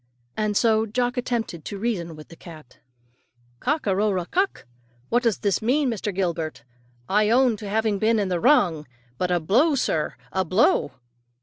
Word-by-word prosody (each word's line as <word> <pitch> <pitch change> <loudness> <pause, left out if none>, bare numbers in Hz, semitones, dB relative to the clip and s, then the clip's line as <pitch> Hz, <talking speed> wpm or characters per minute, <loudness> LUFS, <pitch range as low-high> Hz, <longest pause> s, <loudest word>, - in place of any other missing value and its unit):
And 215 -1 0
so 225 -1 +3
Jock 245 +3 -1
attempted 235 -9 -3
to 205 - -5
reason 190 -7 -3
with 155 0 -13
the 165 - -12
cat. 155 -6 -14 0.8
"Cock 300 +4 -1
a 195 -2 +1
ro 210 +2 +1
ra 180 -3 -1
kuk? 380 - -1 0.4
What 240 - +2
does 230 -5 +1
this 200 0 0
mean, 260 +5 +1
Master 210 -2 -3
Gilbert? 170 -8 -3 0.4
I 210 +2 +2
own 245 0 +4
to 205 -1 -7
having 215 -1 0
been 225 +2 +2
in 205 -2 0
the 180 -2 -1
wrong; 175 - +3 0.3
but 180 - 0
a 175 -1 +2
blow, 250 - +3
sir 160 - -1 0.2
a 190 - 0
blow!" 185 - +2
210 Hz, 180 wpm, -24 LUFS, 180-240 Hz, 0.8 s, own